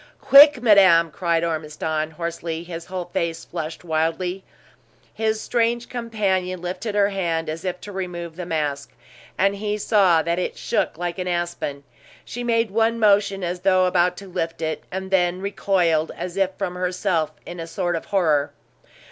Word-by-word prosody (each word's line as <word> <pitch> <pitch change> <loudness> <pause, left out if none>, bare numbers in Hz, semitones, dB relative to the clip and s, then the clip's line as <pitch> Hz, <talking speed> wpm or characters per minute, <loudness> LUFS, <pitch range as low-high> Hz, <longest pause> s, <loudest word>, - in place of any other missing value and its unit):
"Quick, 280 -2 +7
madame!" 185 -7 +6
cried 170 0 0
Ormiston, 155 -1 -2
hoarsely, 165 0 -5
his 170 -1 -7
whole 185 -1 -5
face 165 -1 -2
flushed 160 +2 -6
wildly. 170 +3 -1 0.7
His 220 0 0
strange 235 +1 0
companion 200 -6 -1
lifted 185 +5 -4
her 200 -1 +3
hand 170 -5 -2
as 160 +1 -5
if 180 -1 -3
to 205 - -8
remove 175 -3 -5
the 180 -1 -6
mask, 145 -5 -2 0.4
and 195 +1 +2
he 210 0 -2
saw 195 -6 +3
that 170 +1 -1
it 180 - -3
shook - - -1
like 175 +1 -4
an 180 - -3
aspen. 175 -5 -3 0.4
She 245 - -6
made 230 -3 +1
one 225 +2 +2
motion 200 -3 +3
as 175 +1 -2
though 185 0 +3
about 180 0 +2
to 200 - -9
lift 165 -2 -4
it, 155 0 -3
and 190 +1 -5
then 180 -1 +2
recoiled, 180 -5 +1
as 180 0 -5
if 195 -1 +2
from 190 -3 -3
herself, 180 -3 -1
in 175 - -8
a 165 - -5
sort 175 0 -2
of 165 - -4
horror. 150 -7 +1
180 Hz, 165 wpm, -22 LUFS, 165-200 Hz, 0.7 s, Quick